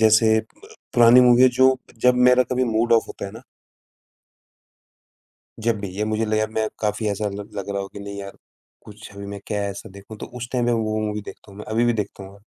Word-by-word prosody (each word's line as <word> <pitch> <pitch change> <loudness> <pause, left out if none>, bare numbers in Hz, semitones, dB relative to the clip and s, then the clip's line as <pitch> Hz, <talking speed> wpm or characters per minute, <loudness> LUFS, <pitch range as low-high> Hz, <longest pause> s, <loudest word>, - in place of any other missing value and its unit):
जैसे 110 0 +5
अ, - - -2 0.5
पुरानी 120 +1 +7
मूवी 125 0 +6
है 130 - +8
जो 130 0 +5 0.3
जब 125 0 +5
मेरा 125 0 +5
कभी 130 0 +1
मूड 115 0 +1
ऑफ़ 115 - +4
होता - - -7
है 100 - -9
ना 115 +2 -11 2.2
जब 115 -1 0
भी 100 - -5
या 105 - 0
मुझे 110 +1 -1
लगेगा, 110 0 +1
मैं 110 0 -1
काफ़ी 105 0 -1
ऐसा 105 +1 -2
ल 100 +1 -7
लग 100 0 -5
रहा 100 -1 -2
हो 95 - -6
कि, 100 - -11
नहीं 100 0 -7
यार, 100 0 -9 0.5
कुछ 105 0 -12
अभी 100 0 -8
मैं 100 0 -7
क्या 105 -2 -2
ऐसा 100 - -8
देखूँ? 100 +2 -12
तो - - -7
उस 120 0 -6
टाइम 125 -2 0
पे 120 - +2
वो 110 -2 -1
मूवी 105 0 -4
देखता 100 - -12
हूँ 100 - -14
मैं, - - -8
अभी 115 +2 +2
भी 120 - +2
देखता 105 -2 -4
हूँ 95 - -11
मैं, 100 - -17
110 Hz, 235 wpm, -22 LUFS, 100-115 Hz, 2.2 s, है